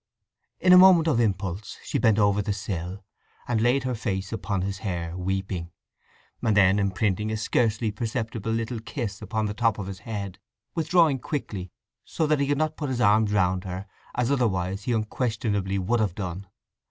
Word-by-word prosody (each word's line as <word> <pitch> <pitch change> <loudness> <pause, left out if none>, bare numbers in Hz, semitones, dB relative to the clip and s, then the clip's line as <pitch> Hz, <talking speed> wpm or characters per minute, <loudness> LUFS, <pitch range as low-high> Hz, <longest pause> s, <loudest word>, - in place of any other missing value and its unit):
In 185 - +6
a 180 - +10
moment 180 -3 +7
of 125 -7 +2
impulse 95 -3 -1
she - - -1
bent 110 -2 +4
over 100 -1 +3
the 105 0 -1
sill, 95 -2 -5 0.4
and 115 -3 +1
laid 125 +3 +3
her 130 -1 -1
face 100 -3 -3
upon 100 -4 -2
his 100 +1 -3
hair, 85 -4 -3
weeping, 95 -1 -3 0.7
and 110 -3 +2
then 95 0 +5
imprinting 100 +1 0
a 110 - -1
scarcely 110 0 +1
perceptible 110 0 -3
little 115 +1 -2
kiss 110 -3 -5
upon 110 +1 -2
the 105 - -2
top 115 0 +1
of 100 - -4
his 95 -1 -7
head, 100 -3 -6 0.3
withdrawing 165 -3 +3
quickly, 100 - -4 0.3
so 160 - -1
that 150 -1 +2
he 140 - +1
could 145 0 +1
not 155 +1 -1
put 145 -3 -3
his 125 -2 -2
arms 105 -2 +4
round 90 -2 +2
her, 95 +1 -5 0.3
as 125 +2 +1
otherwise 100 -7 0
he - - 0
unquestionably 110 -3 -1
would 100 +6 +1
have 100 -5 0
done. 95 0 -5
105 Hz, 180 wpm, -26 LUFS, 95-120 Hz, 0.7 s, a